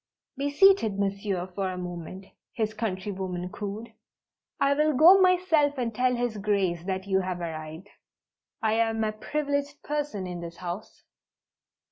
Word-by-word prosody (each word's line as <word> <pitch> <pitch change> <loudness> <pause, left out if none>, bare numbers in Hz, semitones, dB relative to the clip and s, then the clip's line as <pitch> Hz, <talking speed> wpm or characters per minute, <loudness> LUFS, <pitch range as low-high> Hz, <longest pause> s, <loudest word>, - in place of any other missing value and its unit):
"Be 280 +1 -1
seated, 290 - +4
Monsieur, 200 -2 -1
for 195 0 -1
a 185 - -5
moment," 180 +1 -7 0.3
his 220 -2 -1
countrywoman 190 -4 -3
cooed. 210 +4 -6 0.7
"I 280 0 +4
will 300 +1 +2
go 345 +8 +8
myself 350 -6 +3
and 235 -3 -2
tell 250 +3 +2
His 240 -2 -2
Grace 195 -4 0
that 190 0 -2
you 190 -1 +2
have 185 -1 -3
arrived. 160 +1 -6 0.8
I 220 -1 +2
am 225 -1 +1
a 215 - 0
privileged 285 +5 -3
person 290 -10 -3
in 180 -1 -5
this 170 0 -8
house!" 180 +4 -7
210 Hz, 145 wpm, -27 LUFS, 185-280 Hz, 0.8 s, go